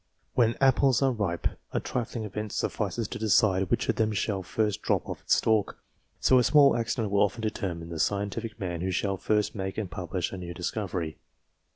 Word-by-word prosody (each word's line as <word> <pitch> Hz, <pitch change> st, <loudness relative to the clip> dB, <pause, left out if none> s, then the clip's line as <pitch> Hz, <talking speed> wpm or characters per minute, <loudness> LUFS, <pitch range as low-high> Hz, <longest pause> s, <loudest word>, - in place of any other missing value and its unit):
When 115 Hz, -2 st, +2 dB
apples 135 Hz, -1 st, +4 dB
are 135 Hz, -, +4 dB
ripe, 100 Hz, -7 st, -1 dB, 0.3 s
a -, -, +1 dB
trifling 120 Hz, -2 st, -3 dB
event 105 Hz, 0 st, -5 dB
suffices 105 Hz, +1 st, -2 dB
to 125 Hz, -, -5 dB
decide, 95 Hz, -3 st, +3 dB
which -, -, +1 dB
of -, -, 0 dB
them 110 Hz, -1 st, +1 dB
shall 100 Hz, -1 st, -1 dB
first 105 Hz, +3 st, -1 dB
drop -, -, 0 dB
off -, -, -6 dB
its -, -, +3 dB
stalk; 110 Hz, -2 st, +1 dB, 0.4 s
so 130 Hz, -, +5 dB
a -, -, +3 dB
small 140 Hz, 0 st, +6 dB
accident 115 Hz, -2 st, -1 dB
will 100 Hz, -, +3 dB
often 105 Hz, +3 st, +1 dB
determine 90 Hz, -6 st, -3 dB
the 85 Hz, -2 st, -5 dB
scientific 100 Hz, +5 st, -1 dB
man 85 Hz, -3 st, -3 dB
who 95 Hz, -, -1 dB
shall 95 Hz, +1 st, 0 dB
first 105 Hz, +3 st, 0 dB
make 95 Hz, -1 st, -4 dB
and 100 Hz, -5 st, -3 dB
publish 90 Hz, -1 st, -3 dB
a 95 Hz, -, -5 dB
new 85 Hz, -1 st, -7 dB
discovery. 90 Hz, -3 st, -3 dB
105 Hz, 195 wpm, -28 LUFS, 95-115 Hz, 0.4 s, small